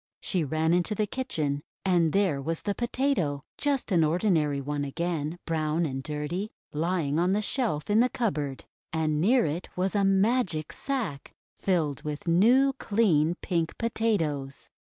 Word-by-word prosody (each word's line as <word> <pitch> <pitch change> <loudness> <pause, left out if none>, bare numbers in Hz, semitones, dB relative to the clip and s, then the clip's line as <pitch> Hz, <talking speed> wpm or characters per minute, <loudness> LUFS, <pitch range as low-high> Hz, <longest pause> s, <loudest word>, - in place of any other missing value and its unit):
She 180 -4 0
ran 160 +3 +1
into 180 +5 +1
the 215 - +1
kitchen, 155 - -2 0.2
and 175 -4 +3
there 185 -8 +1
was 165 +3 -3
the 205 - 0
Potato 235 - 0
— - - -78
just 275 -5 0
an 170 -3 +4
ordinary 155 -3 +2
one 145 +1 -2
again, 160 +2 -2
brown 160 0 0
and 135 -3 -3
dirty, 150 +8 -3
— - - -41
lying 160 -1 0
on 180 +2 +2
the 210 - +1
shelf 210 - -1
in 210 +1 +3
the 250 +2 +4
cupboard, 150 - -2 0.3
and 155 -1 0
near 235 +6 +4
it 160 +5 -3
was 185 +1 0
a 200 - +3
Magic 195 -4 +1
Sack 240 - -4 0.2
filled 160 -8 0
with 150 +2 -5
new, 245 +11 +5
clean, 175 -7 +2
pink 170 -3 -1
Potatoes! 165 - -1
170 Hz, 160 wpm, -27 LUFS, 150-210 Hz, 0.3 s, new